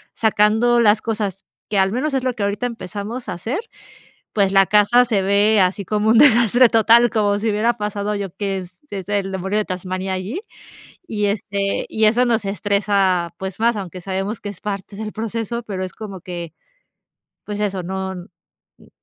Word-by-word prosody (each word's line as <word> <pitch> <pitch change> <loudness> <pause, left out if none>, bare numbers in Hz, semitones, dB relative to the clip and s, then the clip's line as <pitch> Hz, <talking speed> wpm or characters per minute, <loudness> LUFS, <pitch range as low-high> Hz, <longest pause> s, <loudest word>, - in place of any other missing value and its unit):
sacando 220 +2 +3
las 215 0 +4
cosas, 210 -4 -3 0.2
que 210 - -1
al 190 0 +3
menos 270 +6 -1
es 265 -2 0
lo 255 -1 0
que 215 -4 -4
ahorita 200 +4 -1
empezamos 225 +1 -5
a 180 - -2
hacer, 225 - -3 0.7
pues 200 -2 +2
la 195 0 +5
casa 210 +5 +5
se 220 -5 0
ve 205 +2 +3
así 190 +2 +1
como 210 +3 0
un 225 - +5
desastre 240 -2 +6
total, 230 +1 +5
como 205 -2 +1
si 220 +2 0
hubiera 220 +3 +1
pasado 210 0 -2
yo 195 -3 -5
que 195 -2 -2
s 180 0 -12
es 195 -1 -6
el 200 -2 -1
demonio 190 +2 -1
de 215 - 0
Tasmania 185 +1 -4
allí, 200 - -4 0.7
y, 210 -5 -1
este, 200 -1 -2
y 220 0 +1
eso 240 +4 +4
nos 230 -3 +1
estresa, 195 -3 +1
pues 190 +1 -5
más, 235 +1 +2
aunque 185 -3 -6
sabemos 195 +4 -3
que 205 - -5
es 200 - -10
parte 200 -1 -5
del 215 0 -5
proceso, 225 +1 -3
pero 190 -4 -4
es 185 - -6
como 200 -5 -8
que, 170 -3 -7 0.9
pues 210 0 -5
eso, 195 -3 -1
no 190 +1 -3
n 180 -1 -9 0.5
n - - -20
205 Hz, 190 wpm, -20 LUFS, 190-225 Hz, 0.9 s, desastre